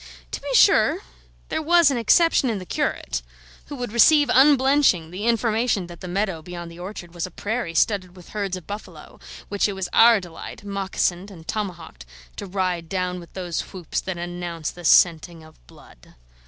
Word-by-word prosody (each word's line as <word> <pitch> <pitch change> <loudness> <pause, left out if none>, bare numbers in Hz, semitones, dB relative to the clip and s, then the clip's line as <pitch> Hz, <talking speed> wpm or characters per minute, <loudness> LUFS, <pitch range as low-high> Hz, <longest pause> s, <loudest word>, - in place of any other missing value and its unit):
To - - -5
be - - -3
sure, - - +5 0.5
there - - -1
was 335 -1 +4
an 265 - -1
exception 280 +3 +4
in 220 - -1
the 185 - -8
curate, 60 - -2 0.5
who 290 - -7
would 245 -4 -5
receive 290 +6 +5
unblenching 265 - +4
the 195 +4 -5
information 230 -3 +1
that 175 0 -12
the 185 - -7
meadow 190 -2 -2
beyond 175 0 -8
the 170 - -13
orchard 175 -2 -8
was 175 0 -3
a - - -11
prairie 205 -1 -4
studded 185 0 +1
with 180 -2 -15
herds 200 -3 -3
of 180 - -12
buffalo, 205 +4 -10 0.3
which 205 +1 0
it - - -3
was 190 -2 -4
our 230 -1 +7
delight, 175 +1 -10
moccasined 195 -1 -2
and 165 -5 -13
tomahawked, 175 - -6 0.3
to 200 - -6
ride 180 -3 -2
down 180 -1 -2
with 170 - -14
those 180 -3 -3
whoops 180 -4 -5
that 190 -2 -5
announce 175 -2 -5
the 175 -1 -11
scenting 165 0 +3
of 155 - -19
blood. - - -18
185 Hz, 180 wpm, -23 LUFS, 175-220 Hz, 0.5 s, our